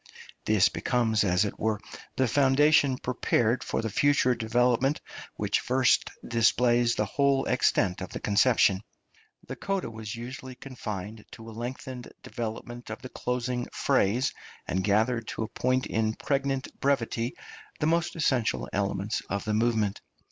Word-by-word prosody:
This 105 -3 +4
becomes, 110 -3 +1
as 90 +1 +2
it 100 - -5
were, 110 -1 0 0.4
the 130 - +2
foundation 140 +1 +4
prepared 125 -2 0
for - - -2
the 110 - -1
future 140 +2 +3
development 120 +4 +1 0.4
which - - 0
first 130 0 +2 0.2
displays 120 0 +3
the 105 - 0
whole 140 +5 +1
extent 100 -7 +1
of 95 - -5
the - - -6
conception. 105 -2 +3 0.7
The - - -5
coda 195 -10 -2
was 110 -1 -6
usually 130 +2 -8
confined 110 -5 -7
to 115 -1 -11
a - - -8
lengthened 125 +2 -6
development 120 +1 -6
of 110 +4 -7
the 130 - -7
closing 125 0 -2
phrase, 125 -2 +1 0.3
and 95 +1 -1
gathered 110 +3 +1
to - - -3
a - - -3
point 130 +3 0
in 110 0 0
pregnant 135 -1 -2
brevity 120 -3 0 0.4
the - - 0
most 170 +2 +1
essential 120 - 0
elements 100 +1 -1
of 100 +1 -2
the 110 - -1
movement. 110 -2 +1
120 Hz, 145 wpm, -28 LUFS, 110-130 Hz, 0.7 s, This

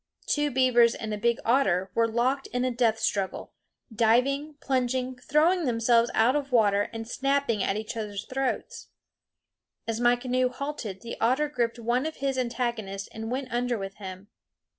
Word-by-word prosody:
Two 295 0 +1
beavers 245 -3 +4
and 215 -1 -4
a - - -2
big 235 +1 +2
otter 195 -7 +2
were 230 0 +3
locked 250 +4 0
in 250 +1 -1
a 255 - 0
death 235 -2 +2
struggle, 195 -3 -2 0.4
diving, 260 +7 +2
plunging, 255 -1 -1
throwing 320 +7 +2
themselves 235 -1 +3
out 235 +5 +4
of 280 -2 -2
water, 205 -4 +3
and 225 -1 -6
snapping 275 -4 0
at 195 +1 0
each 215 +1 -5
other's 210 -3 -4
throats. 265 0 -3 1.0
As 225 0 -2
my 240 0 +4
canoe 255 +1 0
halted 255 -7 -5
the 235 - -6
otter 260 +6 +2
gripped 245 -5 -1
one 240 +5 0
of 315 - -6
his 270 -1 -1
antagonists 235 -6 -3
and 225 0 -6
went 255 0 -4
under 245 0 0
with 195 0 -6
him. 190 0 -9
240 Hz, 165 wpm, -27 LUFS, 220-260 Hz, 1.0 s, beavers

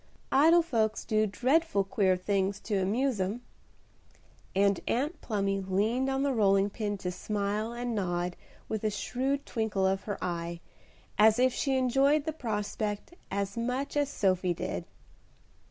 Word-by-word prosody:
Idle 330 +5 +6
folks 225 -8 0
do 215 0 +2
dreadful 255 - +2
queer 195 -3 +2
things 195 +1 0
to 215 - -2
amuse 225 +3 0
'em;" 205 +6 -2 1.1
and 200 -1 +3
Aunt 295 +7 -1
Plumy 195 -3 -1
leaned 215 +8 0
on 270 0 0
the 280 -1 +1
rolling 200 -3 +3
pin 205 -1 -3
to 180 -2 -3
smile 210 +3 -2
and 240 0 -3
nod 175 -3 -1 0.3
with 220 -1 -3
a 215 - +2
shrewd 265 +7 -2
twinkle 220 -5 -1
of 190 0 0
her 205 -2 -3
eye, 170 -1 -3 0.6
as 215 +1 +6
if 255 0 +3
she 270 -1 0
enjoyed 275 +4 +3
the 315 - -2
prospect 210 -1 -3 0.2
as 200 0 -2
much 250 +5 -2
as 290 -1 +1
Sophie 185 -7 +1
did. - - -4
215 Hz, 150 wpm, -29 LUFS, 195-255 Hz, 1.1 s, Idle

